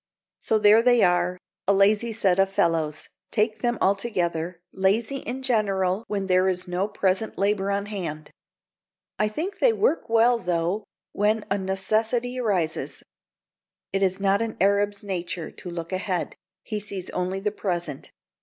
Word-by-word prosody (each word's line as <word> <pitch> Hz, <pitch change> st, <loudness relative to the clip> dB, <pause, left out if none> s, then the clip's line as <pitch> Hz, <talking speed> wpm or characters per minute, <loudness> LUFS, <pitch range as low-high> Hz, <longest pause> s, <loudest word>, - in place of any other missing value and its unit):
So 220 Hz, -, +1 dB
there 210 Hz, +1 st, +6 dB
they 245 Hz, -1 st, +4 dB
are 180 Hz, 0 st, +2 dB, 0.3 s
a 200 Hz, -, +5 dB
lazy 205 Hz, +4 st, +3 dB
set 195 Hz, -4 st, +1 dB
of 195 Hz, 0 st, +4 dB
fellows, 165 Hz, -5 st, 0 dB, 0.2 s
take 215 Hz, 0 st, +1 dB
them 240 Hz, +1 st, 0 dB
all 195 Hz, -, +4 dB
together; 175 Hz, -5 st, -2 dB
lazy 215 Hz, +8 st, +1 dB
in 265 Hz, 0 st, -5 dB
general 200 Hz, -5 st, +1 dB
when 200 Hz, -2 st, -2 dB
there 185 Hz, 0 st, +3 dB
is 180 Hz, -1 st, -1 dB
no 180 Hz, +3 st, -1 dB
present 200 Hz, +1 st, -1 dB
labor 200 Hz, 0 st, +1 dB
on 200 Hz, 0 st, 0 dB
hand. 165 Hz, -7 st, -5 dB, 0.9 s
I 215 Hz, -, +3 dB
think 360 Hz, -, -4 dB
they -, -, +5 dB
work 370 Hz, -, +1 dB
well, 230 Hz, +1 st, +4 dB
though, 180 Hz, +2 st, -1 dB, 0.3 s
when 210 Hz, +1 st, +1 dB
a 200 Hz, -, +2 dB
necessity 220 Hz, +6 st, 0 dB
arises. 185 Hz, -9 st, -1 dB, 0.9 s
It 195 Hz, -, 0 dB
is 190 Hz, 0 st, +1 dB
not 200 Hz, +1 st, +2 dB
an 225 Hz, -1 st, -3 dB
Arab's 200 Hz, +1 st, +2 dB
nature 175 Hz, -4 st, -4 dB
to 180 Hz, -, -9 dB
look 170 Hz, +1 st, -6 dB
ahead; 185 Hz, -1 st, -2 dB, 0.3 s
he 215 Hz, -2 st, -3 dB
sees 195 Hz, -3 st, -6 dB
only 180 Hz, +1 st, -2 dB
the 210 Hz, +1 st, -1 dB
present. 175 Hz, -8 st, -4 dB
200 Hz, 155 wpm, -25 LUFS, 180-220 Hz, 0.9 s, there